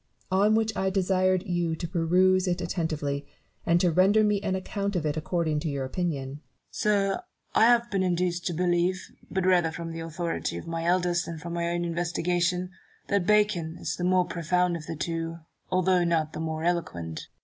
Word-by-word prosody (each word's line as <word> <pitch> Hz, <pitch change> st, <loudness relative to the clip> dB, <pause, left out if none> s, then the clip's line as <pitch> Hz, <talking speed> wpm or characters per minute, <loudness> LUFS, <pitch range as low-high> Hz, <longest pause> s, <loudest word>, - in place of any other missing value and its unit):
On 205 Hz, +3 st, +4 dB
which 220 Hz, -1 st, +1 dB
I 190 Hz, -, +1 dB
desired 185 Hz, -1 st, +2 dB
you 175 Hz, -3 st, 0 dB
to 170 Hz, -, -5 dB
peruse 180 Hz, +3 st, +3 dB
it 175 Hz, 0 st, 0 dB
attentively, 155 Hz, -5 st, -2 dB, 0.4 s
and 170 Hz, +1 st, +4 dB
to 180 Hz, -, +3 dB
render 195 Hz, +6 st, +4 dB
me 210 Hz, -1 st, +2 dB
an 195 Hz, -2 st, -1 dB
account 200 Hz, +1 st, -3 dB
of 165 Hz, -3 st, -1 dB
it 150 Hz, 0 st, 0 dB
according 160 Hz, -1 st, -1 dB
to 160 Hz, +1 st, -3 dB
your 140 Hz, -2 st, -2 dB
opinion. 140 Hz, -2 st, -2 dB
Newton, 145 Hz, +2 st, -9 dB, 0.3 s
Sir, 200 Hz, -2 st, +1 dB, 0.3 s
I 220 Hz, -, +5 dB
have 235 Hz, 0 st, +4 dB
been 195 Hz, -2 st, +1 dB
induced 175 Hz, -1 st, 0 dB
to 175 Hz, -, -1 dB
believe, 175 Hz, +2 st, +1 dB, 0.3 s
but 190 Hz, -1 st, -1 dB
rather 175 Hz, -3 st, +3 dB
from 165 Hz, 0 st, -6 dB
the 165 Hz, -, -6 dB
authority 165 Hz, +1 st, -3 dB
of -, -, -7 dB
my 165 Hz, 0 st, -3 dB
elders 175 Hz, 0 st, +2 dB
than 170 Hz, -1 st, -6 dB
from 170 Hz, +2 st, -6 dB
my 170 Hz, 0 st, -1 dB
own 175 Hz, 0 st, -1 dB
inves 170 Hz, 0 st, -2 dB
tigation, 180 Hz, +1 st, 0 dB, 0.4 s
that 200 Hz, -3 st, +1 dB
Bacon 205 Hz, -6 st, +2 dB
is -, -, -3 dB
the 180 Hz, -, -5 dB
more 180 Hz, 0 st, +3 dB
profound 180 Hz, +1 st, 0 dB
of 155 Hz, -2 st, -7 dB
the 165 Hz, -, -4 dB
two, 165 Hz, +1 st, -3 dB, 0.3 s
although 185 Hz, -1 st, +3 dB
not 160 Hz, -2 st, 0 dB
the -, -, -5 dB
more 160 Hz, 0 st, -3 dB
eloquent. 85 Hz, -, -2 dB
175 Hz, 195 wpm, -27 LUFS, 165-185 Hz, 0.4 s, I